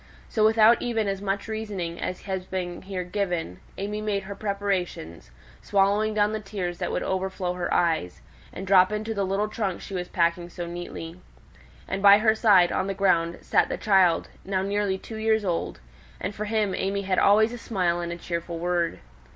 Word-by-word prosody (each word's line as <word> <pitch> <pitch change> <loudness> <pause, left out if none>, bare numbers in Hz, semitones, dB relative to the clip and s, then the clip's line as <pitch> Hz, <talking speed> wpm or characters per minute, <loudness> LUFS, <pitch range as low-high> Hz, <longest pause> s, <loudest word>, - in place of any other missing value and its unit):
So, 215 - +1
without 220 +1 +5
even 225 -3 -1
as 195 -1 -2
much 200 +1 -2
reasoning 205 -6 -4
as 185 - -4
has 190 -2 -4
been 180 -2 -4
here 190 -1 -4
given, 180 - -3 0.2
AimÄe 210 +2 -3
made 200 -2 -1
her 200 +1 -6
preparations, 195 - -3 0.3
swallowing 205 +2 +2
down 210 0 +2
the 220 - -2
tears 195 -4 -5
that - - -2
would - - -1
overflow 190 -1 -2
her 180 -1 -3
eyes, 160 - 0 0.3
and 190 - -7
drop 185 0 +5
into 215 +1 -2
the 200 -2 -1
little 195 +2 0
trunk 205 -4 -3
she - - -9
was 180 -1 -3
packing 170 0 0
so 175 0 -6
neatly. 170 0 -7 0.7
And 190 - -3
by 200 0 +9
her 220 +1 +3
side, 200 -6 +5
on 190 - -1
the 195 - -2
ground, 170 -3 +2
sate - - +2
the - - -2
child, 190 -5 +3 0.2
now 190 -1 -1
nearly 200 -1 0
two 220 +3 -9
years 220 -1 +1
old; 170 -3 -2 0.4
and 195 - -3
for 210 +1 -4
him 210 -2 0
AimÄe 200 +1 -1
had 185 -1 +1
always 220 +3 +4
a 245 - -7
smile 180 -7 0
and 170 0 -4
a 170 - -5
cheerful 170 0 -4
word. 175 0 -1
195 Hz, 190 wpm, -26 LUFS, 175-210 Hz, 0.7 s, by